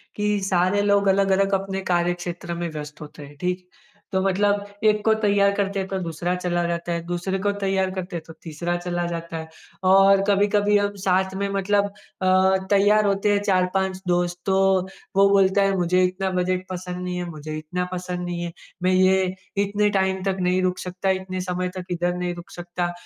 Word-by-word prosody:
कि 210 0 0
सारे 185 +2 +2
लोग 200 -1 +3
अलग-अलग 195 0 +3
अपने 195 0 -1
कार्यक्षेत्र 175 0 -1
में 170 0 -3
व्यस्त 150 0 -8
होते 150 -1 -10
हैं। 145 +1 -14
ठीक 180 +1 0
है? 180 0 -30 0.3
तो 190 - +2
मतलब 200 +1 +1 0.2
एक 210 0 +4
को 220 - +5
तैयार 200 -1 +3
करते 200 -1 -1
हैं, 190 - -3
तो 190 - -3
दूसरा 170 +1 -2
चला 175 -1 -1
जाता 170 0 -3
है। 170 - -2
दूसरे 180 +2 -2
को 205 - +3
तैयार 190 -1 +1
करते 185 -1 -5
हैं, 160 - -4
तो 160 - -10
तीसरा 170 +2 -3
चला 175 0 -2
जाता 170 -1 -5
है। 160 0 -6 0.4
और 195 0 +6
कभी-कभी 205 +1 +3
हम 205 0 -1
साथ 190 +1 +2
में 200 +1 -1
मतलब 200 +1 +1 0.4
अ, 185 +1 +4
तैयार 205 +1 +4
होते 200 +1 +2
हैं 200 - +3
4-5 190 -1 0
दोस्त 175 0 0
तो 190 -1 +2 0.6
वो 200 0 +6
बोलता 195 0 +4
है 195 0 +2
मुझे 180 +1 +2
इतना 185 +1 0
बजट 185 0 0
पसंद 180 0 -5
नहीं 180 0 -3
है 180 - -3
मुझे 155 -1 -7
इतना 180 +4 -3
पसंद 180 0 -4
नहीं 175 -1 -4
है। 170 - -4 0.3
मैं 185 - +3
ये 185 0 +3 0.3
इतने 205 +1 +1
टाइम 190 -1 0
तक 195 -1 -1
नहीं 180 +1 +1
रुक 185 0 0
सकता 185 +1 -3
इतने 185 -1 -2
समय 180 0 -2
तक 180 - -5
इधर 175 0 0
नहीं 180 0 -2
रुक 175 +1 -11
सकता, 175 0 -3
185 Hz, 200 wpm, -23 LUFS, 175-195 Hz, 0.6 s, और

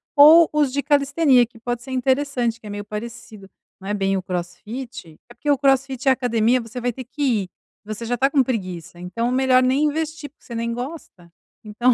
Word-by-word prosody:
ou 310 +3 +8
os 295 -3 +2
de 280 +1 -1
calistenia 285 -3 +3
que 235 -1 -19
pode 240 +1 -3
ser 265 - -10
interessante, 260 -2 0
que 215 - -11
é - - -7
meio 205 0 -6
parecido, 215 -2 -8 0.3
não 195 - -7
é - - 0
bem 195 -1 0
o - - -2
crossfit 185 +3 -7
é - - -13
porque 240 +5 -5
o 285 - +4
crossfit 270 -1 +1
e - - +5
a - - +7
academia 245 -1 +1
você 230 +2 -8
vai 245 0 -1
ter 260 +2 -8
que 265 +5 -9 0.2
ir, 185 - -11 0.4
você 215 +2 -6
já 245 +2 -1
está 265 +3 +2
com 275 -2 +3
preguiça, 185 -9 -5
então 210 +7 -2
melhor 255 0 +3
nem 260 +3 +2
investir 310 0 -3
porque 295 - -35
você 235 - -9
nem 230 0 -2
gosta, 245 - -8 0.3
então 230 +4 +2
245 Hz, 215 wpm, -22 LUFS, 215-270 Hz, 0.4 s, ou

